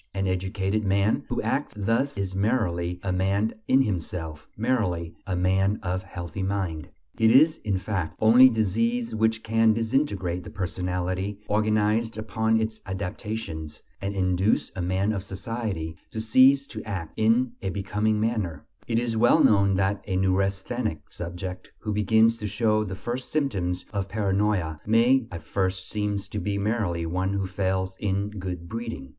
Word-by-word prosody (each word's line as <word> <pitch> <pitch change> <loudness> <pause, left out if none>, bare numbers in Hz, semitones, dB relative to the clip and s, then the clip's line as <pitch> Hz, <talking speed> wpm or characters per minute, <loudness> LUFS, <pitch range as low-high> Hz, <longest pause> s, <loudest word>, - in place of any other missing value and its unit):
An 95 0 0
educated 95 +3 -1
man 100 +2 +1
who - - -1
acts - - -1
thus 115 +6 0
is 95 -1 -2
merely 90 -5 0
a 95 - -1
man 100 +4 +1
in 135 +1 +5
himself, 80 -6 -4
merely 105 -8 0
a 95 - -1
man 95 +3 +2
of 90 0 -1
"healthy 90 -1 -6
mind." 95 -6 -2 0.3
It 110 -1 +5
is, 155 +7 +6
in 100 -3 -1
fact, 95 -4 -3
only 120 +4 +8
disease 115 +2 0
which 110 0 +1
can 115 0 +3
disintegrate 110 - 0
the - - -9
personality 95 +1 -2
organized 110 +1 +1
upon 110 +1 +1
its 110 0 -3
adaptations, 95 -4 -5 0.2
and 100 +1 -3
induce 95 +2 +1
a 95 - -3
man 95 +4 0
of 100 - -2
society 95 -4 -4
to 110 - -5
cease 130 +5 +5
to 110 -5 -7
act 95 -7 -5
in 115 +3 +3
a 95 - -2
becoming 105 +3 0
manner; 105 -9 -1 0.2
it 115 -1 0
is 115 -1 0
well 120 +2 +5
known 100 -2 +4
that 100 +1 0
a 95 - -1
neurasthenic 95 -1 -1
subject 90 +1 -6
who 105 - -3
begins 110 +3 +4
to 105 -2 -4
show 110 +1 +1
the 95 -2 -5
first 120 +6 -5
symptoms 95 - -1
of 100 -1 -2
paranoia, 100 -6 0
may 115 +3 +4
at 85 -3 -7
first 95 +2 -1
seem 105 -1 -1
to 100 +1 -5
be 100 +1 -2
merely 100 -5 -1
one 95 +3 -1
who 100 -1 -1
fails 95 0 -1
in 100 0 -1
good 90 -4 -5
breeding. 115 - -5
100 Hz, 160 wpm, -26 LUFS, 95-110 Hz, 0.3 s, only